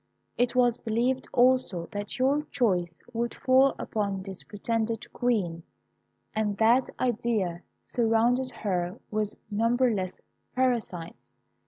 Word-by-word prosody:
It 245 Hz, 0 st, +1 dB
was 245 Hz, -2 st, +3 dB
believed, 240 Hz, +4 st, 0 dB
also, 245 Hz, -9 st, +3 dB
that 205 Hz, +3 st, -5 dB
your 270 Hz, +3 st, +3 dB
choice 180 Hz, -9 st, 0 dB
would 235 Hz, +1 st, -2 dB
fall 265 Hz, +1 st, +4 dB
upon 200 Hz, -3 st, -2 dB
this 190 Hz, -1 st, -6 dB
pretended 225 Hz, +1 st, -3 dB
Queen; 200 Hz, -9 st, 0 dB, 0.7 s
and 210 Hz, -2 st, -1 dB
that 235 Hz, +4 st, +4 dB
idea 215 Hz, -8 st, 0 dB, 0.3 s
surrounded 240 Hz, +2 st, +2 dB
her 180 Hz, -6 st, -2 dB
with 210 Hz, -1 st, -1 dB, 0.2 s
numberless 225 Hz, -3 st, +1 dB, 0.4 s
parasites. 235 Hz, -10 st, -1 dB
225 Hz, 110 wpm, -28 LUFS, 200-245 Hz, 0.7 s, fall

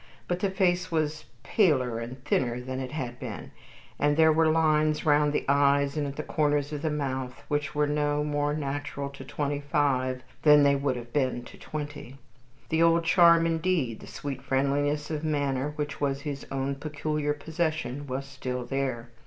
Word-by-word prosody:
But 175 Hz, 0 st, -1 dB
the 200 Hz, -, +1 dB
face 185 Hz, -1 st, +1 dB
was 155 Hz, -1 st, -1 dB, 0.2 s
paler 130 Hz, -, +2 dB
and 125 Hz, +3 st, -8 dB
thinner 125 Hz, -4 st, +1 dB
than 130 Hz, +1 st, -5 dB
it 130 Hz, -1 st, -5 dB
had 125 Hz, -5 st, -5 dB
been, 105 Hz, -, -7 dB, 0.5 s
and 145 Hz, +1 st, +2 dB
there 160 Hz, -1 st, +6 dB
were 160 Hz, 0 st, +4 dB
lines 155 Hz, -1 st, +2 dB
round 150 Hz, -1 st, +4 dB
the 150 Hz, -, -1 dB
eyes 140 Hz, 0 st, +3 dB
and 150 Hz, -2 st, -1 dB
at 140 Hz, -, -6 dB
the 155 Hz, -, -4 dB
corners 145 Hz, -1 st, 0 dB
of 145 Hz, -, -4 dB
the 160 Hz, -, 0 dB
mouth 130 Hz, -4 st, -3 dB
which 145 Hz, 0 st, -1 dB
were 150 Hz, 0 st, +3 dB
no 145 Hz, 0 st, 0 dB
more 145 Hz, 0 st, 0 dB
natural 140 Hz, -1 st, -4 dB
to 140 Hz, -1 st, -10 dB
twenty 145 Hz, +1 st, -2 dB
five 130 Hz, -3 st, 0 dB, 0.2 s
than 150 Hz, -1 st, +7 dB
they 140 Hz, 0 st, +5 dB
would 140 Hz, -1 st, 0 dB
have 120 Hz, -1 st, -8 dB
been 130 Hz, -4 st, 0 dB
to -, -, -12 dB
twenty. 145 Hz, -3 st, -7 dB, 0.5 s
The 160 Hz, +1 st, +2 dB
old 165 Hz, 0 st, +4 dB
charm 170 Hz, -1 st, +6 dB
indeed 165 Hz, -8 st, 0 dB
the -, -, -12 dB
sweet 140 Hz, -2 st, -6 dB
friendliness 145 Hz, +3 st, 0 dB
of 155 Hz, 0 st, -3 dB
manner, 145 Hz, -2 st, 0 dB
which 150 Hz, -1 st, -4 dB
was 140 Hz, -1 st, 0 dB
his 140 Hz, -2 st, -5 dB
own 135 Hz, 0 st, -2 dB
peculiar 150 Hz, 0 st, -2 dB
possession 155 Hz, -3 st, -3 dB
was 135 Hz, +1 st, -3 dB
still 130 Hz, -2 st, -5 dB
there. 125 Hz, -3 st, -3 dB
145 Hz, 180 wpm, -27 LUFS, 135-155 Hz, 0.5 s, than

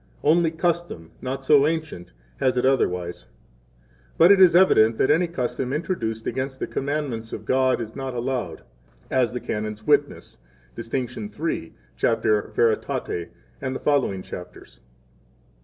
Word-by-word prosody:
8 -, -, +2 dB
Only 165 Hz, +1 st, +4 dB
custom, 165 Hz, -, -2 dB
not 135 Hz, +1 st, -4 dB
so 145 Hz, 0 st, +5 dB
ancient, 155 Hz, -, -4 dB, 0.3 s
has 130 Hz, -1 st, +1 dB
it 125 Hz, -, +2 dB
otherwise. 90 Hz, -, 0 dB, 0.9 s
But 170 Hz, +4 st, +7 dB
it 200 Hz, -1 st, +6 dB
is 180 Hz, -2 st, +7 dB
evident 115 Hz, -12 st, +5 dB
9 -, -, -16 dB
that 140 Hz, -, +4 dB
any 175 Hz, +3 st, +2 dB
custom 130 Hz, -4 st, -3 dB
introduced 120 Hz, -, -3 dB
against 130 Hz, 0 st, -3 dB
the -, -, -1 dB
commandments 135 Hz, -6 st, -3 dB
of -, -, -6 dB
God 130 Hz, -1 st, +2 dB
is 110 Hz, -2 st, -6 dB
not 135 Hz, -1 st, -4 dB
to -, -, -6 dB
be -, -, -5 dB
allowed, 120 Hz, -10 st, -3 dB, 0.5 s
as 130 Hz, -2 st, +2 dB
the 125 Hz, -, -4 dB
Canons 105 Hz, -1 st, -5 dB
witness 145 Hz, -, 0 dB, 0.4 s
(dist. 115 Hz, +2 st, -6 dB
III., 115 Hz, -, -4 dB, 0.3 s
cap. 115 Hz, -1 st, +1 dB
Veritate, 105 Hz, -5 st, 0 dB, 0.3 s
and 130 Hz, -1 st, -3 dB
the -, -, -4 dB
following 130 Hz, -10 st, 0 dB
chapters). 90 Hz, 0 st, -10 dB
130 Hz, 155 wpm, -24 LUFS, 110-150 Hz, 0.9 s, But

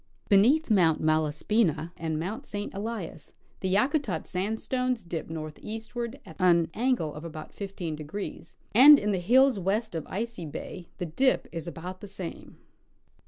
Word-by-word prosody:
Beneath 235 Hz, +9 st, +5 dB
Mount 170 Hz, -6 st, +4 dB
Malas 155 Hz, -1 st, 0 dB
pina 175 Hz, -6 st, +2 dB
and 160 Hz, -2 st, -3 dB
Mount 190 Hz, +7 st, -4 dB
St. 205 Hz, 0 st, -5 dB
Elias 200 Hz, -7 st, -6 dB, 0.3 s
the 190 Hz, -, -1 dB
Yakutat 215 Hz, -, +1 dB
sandstones 225 Hz, +5 st, -1 dB
dip 170 Hz, -2 st, -5 dB
northeast 165 Hz, +8 st, -6 dB
ward 240 Hz, +3 st, -4 dB
at -, -, -12 dB
an 170 Hz, -3 st, +4 dB
angle 235 Hz, -, 0 dB
of 150 Hz, -, -8 dB
about 155 Hz, -2 st, -8 dB
15°, 170 Hz, -2 st, -6 dB, 0.2 s
and 285 Hz, +6 st, +10 dB
in 210 Hz, -5 st, 0 dB
the 190 Hz, -, 0 dB
hills 250 Hz, +5 st, +4 dB
west 205 Hz, +4 st, -1 dB
of 165 Hz, -2 st, -4 dB
Icy 220 Hz, -5 st, -4 dB
bay 170 Hz, +4 st, -7 dB
the 180 Hz, -, -3 dB
dip 260 Hz, -, +1 dB
is 165 Hz, 0 st, -5 dB
about 180 Hz, +2 st, -7 dB
the 205 Hz, -, -8 dB
same. 190 Hz, -3 st, -8 dB
190 Hz, 155 wpm, -28 LUFS, 165-225 Hz, 0.3 s, and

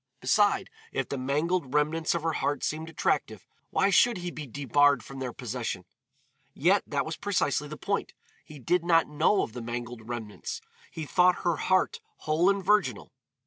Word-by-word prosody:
Beside, 195 Hz, +8 st, +2 dB, 0.2 s
if 135 Hz, -, -2 dB
the 140 Hz, -, -3 dB
mangled 145 Hz, +2 st, -1 dB
remnants 155 Hz, +2 st, +1 dB
of 170 Hz, -, -2 dB
her 165 Hz, -1 st, 0 dB
heart 145 Hz, -1 st, -1 dB
seemed 160 Hz, +1 st, -2 dB
attractive, 165 Hz, -, -1 dB, 0.2 s
why 200 Hz, -, +2 dB
should 235 Hz, +3 st, +5 dB
he 175 Hz, 0 st, -4 dB
be 155 Hz, -3 st, -7 dB
debarred 145 Hz, 0 st, +3 dB
from 135 Hz, 0 st, -9 dB
their 130 Hz, -2 st, -3 dB
possession? 115 Hz, -6 st, -4 dB, 0.7 s
Yet, -, -, +3 dB
that -, -, -1 dB
was -, -, -5 dB
precisely -, -, 0 dB
the -, -, -8 dB
point; -, -, -2 dB, 0.3 s
he 150 Hz, -, -12 dB
did 170 Hz, +7 st, +1 dB
not 165 Hz, -1 st, +4 dB
know 150 Hz, +7 st, +2 dB
of 110 Hz, -, -6 dB
the 120 Hz, -, -6 dB
mangled 120 Hz, -1 st, -6 dB
remnants, 120 Hz, -, -5 dB, 0.3 s
he 160 Hz, -2 st, -6 dB
thought 180 Hz, +4 st, +3 dB
her 170 Hz, -3 st, +2 dB
heart 185 Hz, -, +1 dB, 0.2 s
whole 160 Hz, +4 st, +2 dB
and 200 Hz, -2 st, 0 dB
virginal. 210 Hz, +2 st, +1 dB
150 Hz, 175 wpm, -28 LUFS, 130-180 Hz, 0.7 s, should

